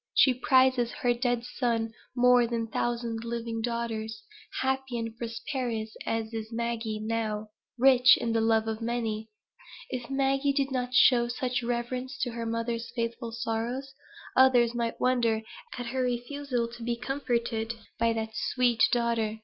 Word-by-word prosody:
She 260 Hz, -, +6 dB
prizes 255 Hz, -1 st, +3 dB
her 245 Hz, -3 st, +1 dB
dead 240 Hz, -1 st, 0 dB
son 230 Hz, -3 st, -1 dB, 0.2 s
more 250 Hz, -1 st, +5 dB
than 230 Hz, -1 st, -1 dB
a 225 Hz, -, -8 dB
thousand 235 Hz, -1 st, -2 dB
living 230 Hz, -1 st, -3 dB
daughters, 230 Hz, -, -3 dB, 0.4 s
happy 265 Hz, -2 st, -1 dB
and 225 Hz, -1 st, -4 dB
prosperous 230 Hz, -1 st, -4 dB
as 225 Hz, 0 st, -2 dB
is 220 Hz, 0 st, -5 dB
Maggie 230 Hz, -2 st, -2 dB
now 215 Hz, -1 st, -2 dB, 0.3 s
rich 255 Hz, 0 st, +7 dB
in 230 Hz, -1 st, -1 dB
the 225 Hz, -, +2 dB
love 225 Hz, 0 st, +2 dB
of 220 Hz, 0 st, -3 dB
many. 225 Hz, -2 st, -2 dB, 0.6 s
If 250 Hz, -1 st, -4 dB
Maggie 275 Hz, +1 st, +1 dB
did 275 Hz, -1 st, 0 dB
not 250 Hz, -1 st, -2 dB
show 245 Hz, -1 st, +6 dB
such 250 Hz, 0 st, -1 dB
reverence 245 Hz, +2 st, -3 dB
to 245 Hz, -, -2 dB
her 230 Hz, 0 st, -4 dB
mother's 230 Hz, 0 st, -2 dB
faithful 230 Hz, 0 st, -3 dB
sorrows, 235 Hz, +4 st, -3 dB, 0.4 s
others 245 Hz, -3 st, +5 dB
might 235 Hz, -1 st, -2 dB
wonder 235 Hz, -3 st, +2 dB, 0.3 s
at 245 Hz, -, -4 dB
her 260 Hz, +2 st, -2 dB
refusal 250 Hz, 0 st, -1 dB
to 240 Hz, 0 st, -11 dB
be 235 Hz, +1 st, -1 dB
comforted 235 Hz, -3 st, -2 dB, 0.2 s
by 230 Hz, 0 st, +3 dB
that 220 Hz, -1 st, -2 dB
sweet 240 Hz, -1 st, +1 dB
daughter. 230 Hz, -2 st, +1 dB
235 Hz, 150 wpm, -28 LUFS, 225-250 Hz, 0.6 s, rich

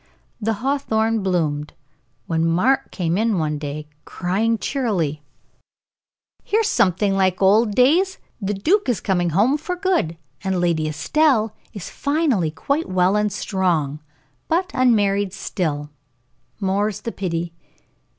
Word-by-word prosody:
The 225 Hz, +1 st, +1 dB
hawthorn 225 Hz, -6 st, +1 dB
bloomed, 155 Hz, -6 st, -1 dB, 0.5 s
when 165 Hz, -1 st, 0 dB
Mark 185 Hz, +12 st, +2 dB
came 175 Hz, 0 st, -1 dB
in 220 Hz, -2 st, +1 dB
one 155 Hz, -2 st, -1 dB
day, 150 Hz, +1 st, -5 dB, 0.2 s
crying 210 Hz, +6 st, 0 dB
cheerily: 190 Hz, -, -1 dB, 1.2 s
"Here's 440 Hz, +1 st, +1 dB
something 195 Hz, -, +2 dB
like 190 Hz, -1 st, +2 dB
old 205 Hz, +2 st, +4 dB
days. 345 Hz, +10 st, +3 dB, 0.2 s
The 205 Hz, +1 st, -1 dB
duke 335 Hz, -, +1 dB
is 235 Hz, -, +1 dB
coming 180 Hz, -3 st, 0 dB
home 220 Hz, -, +2 dB
for 360 Hz, +4 st, -3 dB
good, 355 Hz, -, 0 dB, 0.3 s
and 190 Hz, -1 st, 0 dB
Lady 170 Hz, -3 st, +1 dB
Estelle 220 Hz, -, +2 dB, 0.2 s
is 200 Hz, -4 st, -8 dB
finally 280 Hz, -, +1 dB
quite 280 Hz, -, -2 dB
well 185 Hz, +1 st, +2 dB
and 210 Hz, 0 st, +1 dB
strong, 170 Hz, -8 st, -1 dB, 0.5 s
but 360 Hz, +4 st, 0 dB
unmarried 205 Hz, -6 st, +2 dB
still 155 Hz, -7 st, -3 dB, 0.7 s
more's 200 Hz, +1 st, 0 dB
the 230 Hz, -, -4 dB
pity." 170 Hz, -4 st, -3 dB
195 Hz, 125 wpm, -21 LUFS, 170-245 Hz, 1.2 s, old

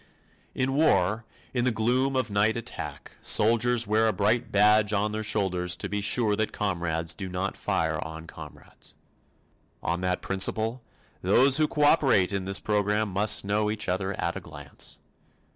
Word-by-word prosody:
In 130 Hz, +1 st, 0 dB
war, 115 Hz, -, +2 dB, 0.3 s
in 120 Hz, -2 st, 0 dB
the 125 Hz, -, +2 dB
gloom 125 Hz, +5 st, 0 dB
of 130 Hz, -4 st, -1 dB
night 105 Hz, +3 st, +2 dB
attack, 115 Hz, -, -7 dB
soldiers 115 Hz, +2 st, +3 dB
wear 110 Hz, +2 st, +2 dB
a -, -, +3 dB
bright 105 Hz, +3 st, 0 dB
badge 105 Hz, +1 st, +4 dB
on 105 Hz, +1 st, 0 dB
their 110 Hz, 0 st, -3 dB
shoulders 90 Hz, -4 st, 0 dB
to 100 Hz, -, -5 dB
be 100 Hz, +1 st, -3 dB
sure 105 Hz, +1 st, +2 dB
that 110 Hz, -1 st, -1 dB
comrades 85 Hz, -4 st, -1 dB
do 95 Hz, +1 st, -7 dB
not 90 Hz, +2 st, -3 dB
fire -, -, -1 dB
on 80 Hz, 0 st, -9 dB
comrades. -, -, -11 dB, 0.9 s
On 85 Hz, +1 st, -2 dB
that 90 Hz, 0 st, -2 dB
principle, 110 Hz, +5 st, -1 dB, 0.4 s
those 130 Hz, +9 st, +4 dB
who 155 Hz, -1 st, +3 dB
cooperate 145 Hz, -, +3 dB
in 95 Hz, -1 st, -2 dB
this 95 Hz, +1 st, 0 dB
program 105 Hz, 0 st, 0 dB
must 100 Hz, +2 st, +2 dB
know 105 Hz, +1 st, 0 dB
each 105 Hz, 0 st, -2 dB
other 95 Hz, +2 st, -2 dB
at 85 Hz, -, -2 dB
a -, -, -4 dB
glance. 75 Hz, -4 st, -6 dB
105 Hz, 160 wpm, -26 LUFS, 95-115 Hz, 0.9 s, badge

